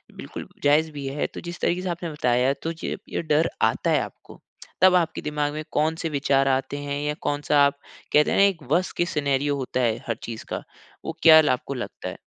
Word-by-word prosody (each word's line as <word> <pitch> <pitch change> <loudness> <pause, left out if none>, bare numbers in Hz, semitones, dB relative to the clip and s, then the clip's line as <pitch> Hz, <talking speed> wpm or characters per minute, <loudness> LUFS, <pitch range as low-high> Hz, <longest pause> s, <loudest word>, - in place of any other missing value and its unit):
बिल्कुल - - -8 0.2
जायज़ 150 +2 +3
भी 145 -2 -7
है। 140 +2 -2
तो - - -7
जिस 175 0 -7
तरीके 180 +1 +1
से 185 - -3
आपने 170 -1 -4
बताया 125 -3 +2
तो 165 - -2
जब 165 - -5
ये - - -2
डर 155 0 +2
आता - - +2
है - - +4
आपको, - - -10 0.4
तब 185 0 +7
आपके 170 -3 +1
दिमाग़ 150 -1 -2
में 155 +1 -4
कौन-से 160 +2 0
विचार 135 -2 +2
आते 135 +1 0
हैं? 145 0 -3
या 150 - 0
कौन-सा 145 0 +2
आप 140 0 0 0.4
कहते 150 0 +5
हैं - - +1
ना - - +6
एक 190 -6 +2
वर्स्ट 180 +4 +1
केस 175 0 +1
सिनेरियो 145 -1 +1
होता 130 -1 -3
है 115 -3 +1
हर 115 - 0
चीज़ 115 -1 -7
का, - - -4 0.4
वो 160 - -5
क्या 160 -1 +9
ल 150 - +1
आपको 130 +2 -1
लगता 125 -3 -6
है? - - -8
150 Hz, 225 wpm, -24 LUFS, 140-165 Hz, 0.4 s, क्या